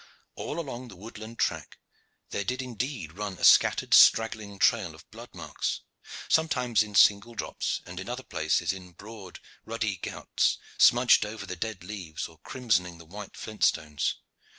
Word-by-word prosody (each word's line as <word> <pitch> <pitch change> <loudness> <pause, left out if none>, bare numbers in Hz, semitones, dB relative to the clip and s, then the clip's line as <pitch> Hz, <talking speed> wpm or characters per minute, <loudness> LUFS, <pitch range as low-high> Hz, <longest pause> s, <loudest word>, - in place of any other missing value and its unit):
All 155 - -5
along 130 -5 -6
the 100 - -12
woodland 110 +3 -10
track - - -2 0.5
there 100 - -2
did 125 +6 -2
indeed 125 - -4
run 105 +1 -4
a - - -10
scattered - - +5
straggling 110 -3 +5
trail - - +2
of - - -17
blood - - -11
marks, - - -3 0.5
sometimes 125 -8 +2
in 105 -1 -4
single 105 +4 +5
drops, - - -3
and 90 0 -8
in 95 - -7
other 125 +1 -4
places 80 0 0
in 90 -2 -11
broad, 100 0 -11 0.2
ruddy 110 -4 -2
gouts, - - -1 0.2
smudged 120 +1 +6
over 105 -1 -6
the 90 - -5
dead 100 0 -5
leaves 90 -5 -6
or 80 -1 -19
crimsoning 90 -6 -1
the 85 - -14
white 100 +5 -10
flint 110 -1 -6
stones. 75 -2 +1
105 Hz, 160 wpm, -28 LUFS, 90-120 Hz, 0.5 s, smudged